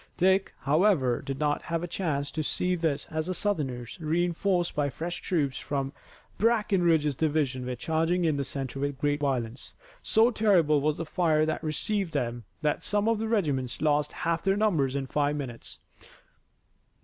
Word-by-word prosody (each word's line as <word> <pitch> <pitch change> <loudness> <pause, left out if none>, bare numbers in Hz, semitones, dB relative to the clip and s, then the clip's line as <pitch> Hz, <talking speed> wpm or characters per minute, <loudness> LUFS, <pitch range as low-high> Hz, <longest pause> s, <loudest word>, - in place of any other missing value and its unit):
Dick, 190 +2 +2
however, 145 - +3
did 135 -1 -5
not 150 0 0
have 165 0 -3
a - - -2
chance 150 -6 -2
to 160 - -2
see 180 +4 0
this 160 -5 -1
as 155 +1 -2
the 185 - -2
Southerners, 135 - -2
reinforced 175 +3 0
by 145 -1 0
fresh 170 +5 -5
troops 145 -8 0
from 135 -1 -3 0.5
Breckinridge's 180 -9 +3
division, 140 -4 0
were 125 - -2
charging 165 +6 0
in 155 -2 +2
the 140 - -1
center 135 -1 -5
with 140 0 -2
great 145 +1 0
violence. 130 -4 -3 0.3
So 225 +3 +4
terrible 175 - +3
was 150 +1 +1
the 165 - -3
fire 155 -2 +2
that 155 +1 -2
received 190 +4 -1
them 120 -2 -2 0.2
that 150 -1 +1
some 205 +1 0
of 225 -2 +2
the 225 - -2
regiments 145 - 0
lost 150 -1 +1
half 165 0 +1
their 195 0 +1
numbers 160 -11 +1
in 140 -1 -1
five 145 +2 0
minutes. 130 -5 -6
155 Hz, 170 wpm, -28 LUFS, 140-180 Hz, 0.5 s, So